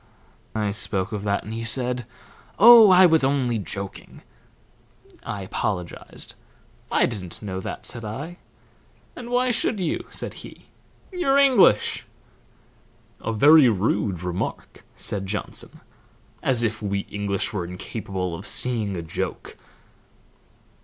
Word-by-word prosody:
I 105 -2 0
spoke 100 -1 -2
of 105 -2 -4
that, 100 0 0
and 110 - -7
he 115 0 -4
said, 125 0 -1 0.5
'Oh, 230 -1 +9
I 185 0 +7
was 160 -4 +4
only 130 -4 +1
joking.' 100 -1 -7 1.0
I 100 - -5
apologized. 95 -2 -5 0.6
'I - - +3
didn't 95 -7 -7
know 95 -2 -4
that,' - - -7
said 120 - -3
I. 140 +12 -6 0.8
'And 240 -1 -8
why 250 +1 +2
should 220 -2 0
you?' 175 -4 -2
said - - -4
he. - - -13 0.5
'You're 340 -7 +1
English.'" 255 - +4 1.1
"A - - -3
very 140 +4 +6
rude 100 -3 -1
remark," 90 0 -5
said 95 -2 -2
Johnson. 105 +2 -4 0.6
"As 125 -3 +2
if 110 -1 -2
we 100 -1 -1
English 100 -1 -3
were 95 -4 -2
incapable 90 0 -5
of 95 +5 -6
seeing 110 -4 +1
a 85 - -5
joke!" 80 - -5
110 Hz, 125 wpm, -23 LUFS, 100-145 Hz, 1.1 s, Oh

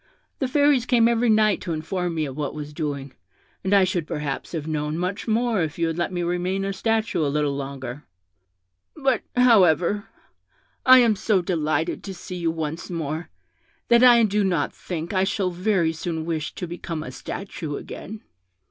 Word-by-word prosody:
The 265 - 0
Fairies 285 -2 +3
came 235 -2 +4
every 235 0 +2
night 215 -2 +3
to 175 -3 -3
inform 175 +2 -2
me 155 -1 0
of 135 -2 -6
what 150 0 -3
was 150 0 -7
doing, 140 -3 -4 0.5
and 190 - -1
I 200 -1 +6
should 175 -4 -1
perhaps 150 0 -4
have 160 -3 -3
known 150 0 -2
much 180 +5 -3
more 225 -2 +1
if 160 -1 -3
you 170 - +1
had 165 0 -2
let 175 - -1
me 175 -1 -2
remain 180 +3 -1
a 195 - -2
statue 220 -5 0
a 145 - +1
little 145 -1 0
longer; 135 -1 -6 0.9
but, 270 -6 +1
however, 205 - +4 0.8
I 255 0 +10
am 235 -4 +5
so 195 -1 +1
delighted 160 -3 -1
to 195 -2 -6
see 180 +1 -7
you 170 -2 0
once 160 0 -4
more, 160 -1 -4 0.6
that 235 +1 +6
I 240 -2 +7
do 210 -1 +2
not 175 -7 0
think 170 0 -5
I 190 -1 +2
shall 190 -1 0
very 180 -2 +1
soon 160 0 -4
wish 160 -2 -3
to - - -4
become 165 -2 -5
a 130 - -7
statue 160 0 -6
again.' 215 +7 -8
175 Hz, 185 wpm, -24 LUFS, 155-210 Hz, 0.9 s, I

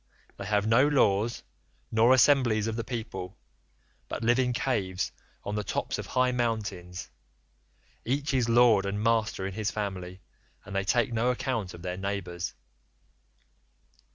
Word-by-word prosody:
They - - -7
have 105 -1 +1
no 115 +6 +5
laws 115 -6 +2 0.5
nor 115 +3 +4
assemblies 130 -5 +4
of 110 -1 -2
the 115 - -2
people, 95 -7 -6 0.7
but - - -4
live 120 +2 +3
in 125 -1 +2
caves 100 -8 -1 0.3
on 100 - -4
the 105 0 -1
tops - - -2
of - - -5
high 130 0 +2
mountains; 110 -7 -3 0.9
each 140 +4 -1
is 125 -3 +2
lord 115 -4 +5
and 100 +1 -2
master 110 -4 +1
in 95 - -4
his 110 +1 -1
family, 95 -3 -5 0.4
and 100 - -8
they 95 0 0
take 120 +3 +2
no 115 +2 +1
account 120 -6 -2
of 85 - -12
their 90 0 -3
neighbours. 95 -3 -4
110 Hz, 150 wpm, -28 LUFS, 95-120 Hz, 0.9 s, no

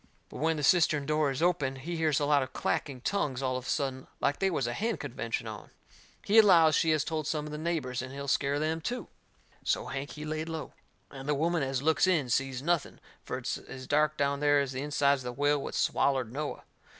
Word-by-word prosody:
But - - -9
when 160 +1 +1
the 150 - -3
cistern 155 -3 +4
door 150 0 +2
is 135 +4 -2
opened, 145 -7 +1
he 170 +4 -4
hears 160 -3 +2
a 145 - +1
lot 145 -1 +4
of 130 -1 -5
clacking 135 -4 -2
tongues 140 -7 -1
all 130 -1 0
of 130 0 -5
a - - -4
sudden 130 -2 -2
like 140 0 0
they 195 - +2
was 150 -8 -1
a 120 - -2
hen 225 - -1
convention 120 -4 -4
on. 110 -1 -8 0.6
He 215 +3 +6
allows 170 -7 +7
she 160 - +3
has 155 -2 +3
told 155 -1 -3
some 150 -2 -1
of 150 - -7
the 150 - -5
neighbours, 155 -7 -2
and 130 +1 -7
he'll 140 +1 -6
scare 140 +1 +1
them 160 +2 -1
too. 245 +9 -4 0.5
So - - 0
Hank, 135 +2 -5
he 150 0 -7
laid 155 +1 -3
low. 160 -1 -5 0.4
And 135 +1 -7
the 150 - +3
woman 165 +3 +1
as 135 -1 -1
looks 160 +4 +3
in 155 -9 +1
sees 135 0 0
nothing, 170 -1 0 0.2
for - - -4
it's - - -3
as 130 -1 -9
dark 150 +2 +2
down 140 0 +1
there 145 0 +4
as 140 -2 -1
the 130 0 -4
insides 140 -1 +2
of - - -11
the - - -17
whale 145 0 +3
what - - -5
swallered 130 -5 +1
Noah. 150 +2 -4
145 Hz, 235 wpm, -30 LUFS, 135-160 Hz, 0.6 s, allows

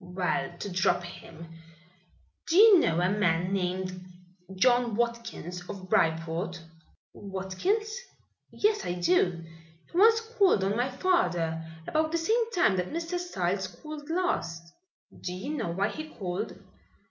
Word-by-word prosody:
"Well, 180 -1 -2
to 200 - -5
drop 180 0 +2
him, 170 -1 -10 1.0
do 330 - +2
you 420 -3 +9
know 170 - +2
a 180 - +2
man 180 -3 +1
named 185 -1 -2 0.5
John 240 +2 +3
Watkins, 235 -6 -3
of 185 -2 -8
Bryport?" 165 +2 0 0.5
"Watkins? 205 - -2 0.5
Yes, 420 0 +1
I 175 - -2
do. 175 -1 +1 0.5
He - - -13
once 445 +4 +6
called 445 - +2
on 195 +2 +1
my 245 +3 0
father, 175 - 0 0.2
about 315 0 +1
the 335 - +1
same 450 +7 +1
time 350 - +2
that 180 0 -1
Mr. 335 +2 -3
Styles 190 - -2
called 295 - -10
last." 170 - -2 0.5
"Do 180 - -4
you 190 +11 -5
know 220 - -2
why 195 +5 0
he 310 +8 -7
called?" 190 -3 -4
195 Hz, 135 wpm, -28 LUFS, -, 1.0 s, you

